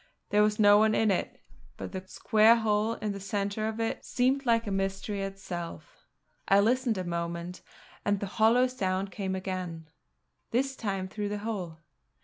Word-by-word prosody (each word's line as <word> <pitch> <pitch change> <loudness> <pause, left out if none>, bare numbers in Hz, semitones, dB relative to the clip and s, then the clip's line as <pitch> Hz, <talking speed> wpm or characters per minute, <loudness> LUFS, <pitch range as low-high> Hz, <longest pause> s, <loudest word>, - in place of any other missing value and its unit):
There 210 - +4
was 210 0 +2
no 205 -1 +7
one 215 0 +3
in 220 -2 +3
it, 185 - -2 0.4
but - - -6
the 190 -1 -5
square 220 +4 +4
hole 220 -1 +1
in 210 - -3
the 200 - -5
centre 200 +2 -2
of 220 0 -4
it 225 0 -2
seemed 265 +2 0
like 230 0 +3
a 205 - -3
mystery 195 +1 -2
itself. 195 - -7 0.4
I 195 - +5
listened 235 +1 +2
a 185 - -2
moment; 170 +1 -4 0.4
and 205 -1 +1
the 200 - -3
hollow 225 +5 +3
sound 195 -6 -2
came 190 -2 -3
again, 185 -4 -5 0.6
this 265 +3 0
time 195 -5 -3
through 205 +1 -4
the 210 - -2
hole. 180 -8 -4
205 Hz, 170 wpm, -29 LUFS, 190-220 Hz, 0.6 s, no